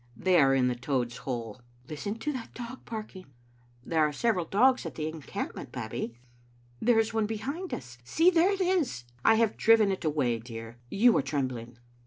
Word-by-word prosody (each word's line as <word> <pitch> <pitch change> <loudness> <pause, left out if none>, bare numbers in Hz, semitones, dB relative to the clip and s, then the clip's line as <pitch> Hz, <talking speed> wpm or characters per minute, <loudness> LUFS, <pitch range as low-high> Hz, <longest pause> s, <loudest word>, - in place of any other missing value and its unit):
"They 185 -2 +4
are 135 -2 +5
in 130 -1 +3
the 125 - +1
Toad's 125 -1 -2
hole." 120 -2 -5
" 120 +1 -30
Listen 155 +8 -4
to 295 +6 -3
that 250 -4 -7
dog 245 +1 -8
barking. 215 -4 -7 0.2
" 120 0 -32
" 120 +1 -31
There 160 -1 +1
are 150 - +2
several 180 +3 0
dogs 250 +9 +3
at - - -6
the 155 -1 -2
encampment. 155 -2 -6
Babbie." 115 +1 -5 0.6
"There 240 0 +4
is 225 0 +2
one 220 -2 +1
behind 280 - -4
us. 120 -2 -7
See, 330 - +4
there 350 +2 +4
it 395 -1 -1
is!" 355 - +1
" - - -32
I 225 - +6
have 225 -1 +2
driven 220 -3 +5
it 190 - -3
away, 140 -7 +1
dear. 115 0 -9
You 230 - +4
are - - +3
trembling. 130 -4 -3
155 Hz, 205 wpm, -29 LUFS, -, 0.6 s, I